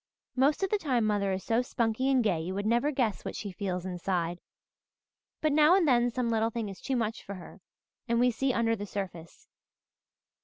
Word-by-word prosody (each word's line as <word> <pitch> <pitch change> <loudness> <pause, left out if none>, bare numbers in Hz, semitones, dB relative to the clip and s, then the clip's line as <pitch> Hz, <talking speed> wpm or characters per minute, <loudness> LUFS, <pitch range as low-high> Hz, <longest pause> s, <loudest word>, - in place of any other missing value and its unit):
Most 280 +7 +2
of 385 - 0
the 420 - +2
time 255 - +1
mother 205 -2 +1
is 190 0 -2
so 230 +1 +2
spunky 245 +1 0
and 260 -3 +3
gay 180 -7 +1
you 180 +3 -4
would 200 +1 -2
never 235 +6 +2
guess 250 -8 -1
what - - -5
she 205 - -5
feels 180 -1 -3
inside; 175 -1 -2 1.0
but 310 - +2
now 305 +4 +6
and 370 -5 +3
then 245 -2 +4
some 245 0 -1
little 225 0 +1
thing 225 -2 -4
is 195 - -10
too 270 - -1
much 225 -2 -1
for 200 - -7
her 185 - -12 0.5
and 235 0 +1
we 250 0 +4
see 265 +3 0
under 230 -2 +1
the 205 -1 -6
surface. 180 -5 -7
225 Hz, 205 wpm, -29 LUFS, 195-255 Hz, 1.0 s, now